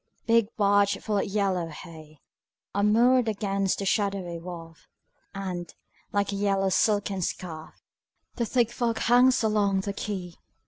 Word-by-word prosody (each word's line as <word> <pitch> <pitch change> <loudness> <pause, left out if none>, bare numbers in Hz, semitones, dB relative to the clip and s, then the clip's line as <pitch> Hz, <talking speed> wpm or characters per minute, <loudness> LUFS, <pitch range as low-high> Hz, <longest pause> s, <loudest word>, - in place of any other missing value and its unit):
Big 230 -2 +3
barges 200 -1 +2
full 210 -2 0
of - - 0
yellow 195 -4 0
hay 155 -1 -12 0.6
Are 200 - 0
moored 235 +4 +4
against 195 -2 -1
the 200 - -4
shadowy 195 -4 -1
wharf, 165 -2 -10 0.5
And, 185 -3 -5 0.4
like 200 0 0
a - - -3
yellow 195 -1 +1
silken 200 0 +1
scarf, 165 -2 -6 0.5
The 235 -2 -1
thick 235 -1 +1
fog 235 -2 -1
hangs 245 +1 +4
along 205 -3 +2
the 200 +1 -4
quay. 190 -4 -5
200 Hz, 140 wpm, -26 LUFS, 185-215 Hz, 0.6 s, moored